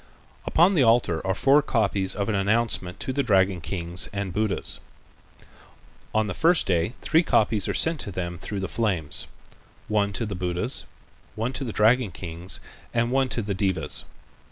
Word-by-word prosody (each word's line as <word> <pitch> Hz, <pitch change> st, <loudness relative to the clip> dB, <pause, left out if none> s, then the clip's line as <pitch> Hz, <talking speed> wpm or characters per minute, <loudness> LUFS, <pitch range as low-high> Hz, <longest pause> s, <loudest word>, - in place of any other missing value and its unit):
Upon 175 Hz, +5 st, +4 dB
the 165 Hz, -, +3 dB
altar 115 Hz, -8 st, +3 dB
are 95 Hz, -, +1 dB
four 140 Hz, +7 st, +5 dB
copies 100 Hz, -8 st, 0 dB
of 100 Hz, 0 st, -2 dB
an 110 Hz, -, 0 dB
announcement 100 Hz, -2 st, 0 dB
to 140 Hz, -2 st, -3 dB
the 140 Hz, -, +1 dB
dragon 95 Hz, -6 st, +2 dB
kings 85 Hz, +1 st, -2 dB
and 100 Hz, -2 st, -4 dB
Buddhas. 105 Hz, -1 st, -1 dB, 1.3 s
On 110 Hz, 0 st, +1 dB
the 105 Hz, -, -3 dB
first 170 Hz, +2 st, +3 dB
day 85 Hz, +4 st, +1 dB
three 160 Hz, +1 st, +4 dB
copies 110 Hz, -, +2 dB
are -, -, -1 dB
sent 165 Hz, -1 st, +2 dB
to 100 Hz, -, -4 dB
them 85 Hz, -2 st, -4 dB
through 100 Hz, +2 st, -4 dB
the 95 Hz, -, -2 dB
flames, 95 Hz, -10 st, -1 dB, 0.6 s
one 105 Hz, -1 st, +1 dB
to 115 Hz, +4 st, -2 dB
the 105 Hz, -, -4 dB
Buddhas, 90 Hz, -1 st, -1 dB, 0.5 s
one 115 Hz, +4 st, -2 dB
to 135 Hz, -, -4 dB
the 120 Hz, -, -4 dB
dragon 110 Hz, +2 st, +3 dB
kings 85 Hz, 0 st, -5 dB, 0.4 s
and 120 Hz, +1 st, +1 dB
one 135 Hz, 0 st, +2 dB
to 115 Hz, -, -2 dB
the 100 Hz, 0 st, -2 dB
devas. 95 Hz, -1 st, -1 dB
105 Hz, 175 wpm, -25 LUFS, 95-120 Hz, 1.3 s, four